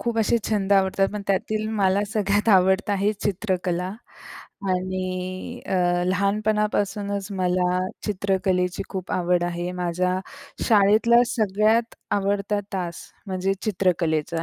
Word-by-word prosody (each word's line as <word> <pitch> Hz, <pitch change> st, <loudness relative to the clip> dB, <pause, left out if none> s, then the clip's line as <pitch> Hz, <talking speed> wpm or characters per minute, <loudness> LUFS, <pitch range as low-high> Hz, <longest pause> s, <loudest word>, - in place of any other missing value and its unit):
खूप 235 Hz, -1 st, -1 dB
असे 225 Hz, +2 st, +3 dB
छंद 200 Hz, -2 st, +1 dB
आवडतात. 195 Hz, 0 st, +3 dB
पण 210 Hz, -1 st, -4 dB
त्यातील 215 Hz, +2 st, -1 dB
मला 190 Hz, +1 st, +3 dB
सगळ्यात 205 Hz, 0 st, +1 dB
आवडतं 190 Hz, +3 st, +2 dB
आहे 200 Hz, +2 st, +1 dB
चित्रकला 185 Hz, -3 st, -2 dB, 0.8 s
आणि 185 Hz, +4 st, -3 dB
अ, -, -, -4 dB, 0.3 s
लहानपणापासूनच 200 Hz, 0 st, 0 dB
मला 180 Hz, 0 st, +1 dB, 0.3 s
चित्रकलेची 190 Hz, -2 st, 0 dB
खूप 190 Hz, -2 st, -5 dB
आवड 180 Hz, -1 st, +1 dB
आहे. 175 Hz, 0 st, -3 dB
माझ्या 180 Hz, +1 st, -1 dB, 0.5 s
शाळेतला 220 Hz, +2 st, +5 dB
सगळ्यात 220 Hz, 0 st, +1 dB, 0.2 s
आवडता 200 Hz, +1 st, 0 dB
तास 175 Hz, -3 st, -3 dB, 0.3 s
म्हणजे 190 Hz, 0 st, -1 dB
चित्रकलेचा 170 Hz, -5 st, 0 dB
195 Hz, 110 wpm, -24 LUFS, 180-210 Hz, 0.8 s, शाळेतला